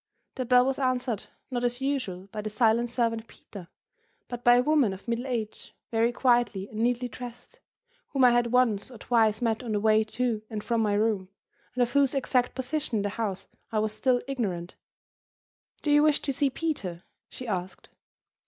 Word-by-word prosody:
The 255 - -3
bell 250 0 +5
was 270 +1 -1
answered, 255 -4 -1 0.2
not, 245 -1 -2
as 245 0 0
usual, 260 -10 -2
by 210 - -4
the 215 - -4
silent 230 +2 +2
servant 230 -2 -1
Peter, 190 -5 -12 0.6
but 245 -1 -6
by 240 0 +7
a 245 - +4
woman 285 -8 +3
of 190 +5 -11
middle 235 +3 -2
age, 230 -4 -4 0.2
very 230 +1 +2
quietly 240 -6 +2
and 215 - -7
neatly 245 +1 +1
dressed, 245 +1 -10 0.5
whom 275 -3 0
I 250 - +7
had 240 0 +3
once 235 -4 +2
or 245 - -11
twice 220 -1 +2
met 225 0 +1
on 235 -3 -4
the 205 - +1
way 215 +1 +4
to 225 0 -2
and 215 -2 -5
from 235 -2 0
my 210 -2 +1
room, 205 -3 0 0.5
and 250 - +3
of 240 - -2
whose 280 -1 +3
exact 255 -2 +1
position 270 0 -2
in 210 - +1
the 205 - -1
house 200 -3 -3 0.3
I 220 - -1
was 215 0 0
still 250 +2 +1
ignorant. 190 -10 -3 1.1
"Do 295 - +1
you 295 0 +6
wish 300 -1 +4
to 275 - -1
see 280 +1 +2
Peter?" 215 - -3 0.3
she 255 - -8
asked. 185 -3 -4
235 Hz, 190 wpm, -27 LUFS, 215-255 Hz, 1.1 s, by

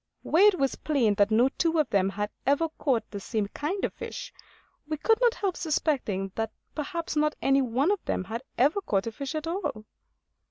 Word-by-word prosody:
Where 370 +6 +5
it 405 -3 +4
was 275 -3 +1
plain 260 -9 +2
that 205 0 +5
no 235 +4 +4
two 330 -1 +2
of 305 -4 +3
them 195 -1 +3
had 205 +1 -3 0.2
ever 285 +4 +3
caught 260 -6 +1
the 200 - -5
same 205 +1 -2
kind 350 - -2
of - - -4
fish, - - -7 0.5
we 310 0 -2
could 445 +9 +2
not 480 -1 +4
help 385 -3 -1
suspecting 255 - -1
that 225 -1 -2 0.2
perhaps 320 +2 -4
not 300 0 +2
any 275 0 +3
one 260 - +1
of 410 - -1
them - - -1
had 220 +5 -5 0.2
ever 295 +11 +3
caught 195 - 0
a 230 - -3
fish 275 +6 -5
at 310 0 -2
all. 330 - -3
280 Hz, 205 wpm, -27 LUFS, 220-330 Hz, 0.5 s, Where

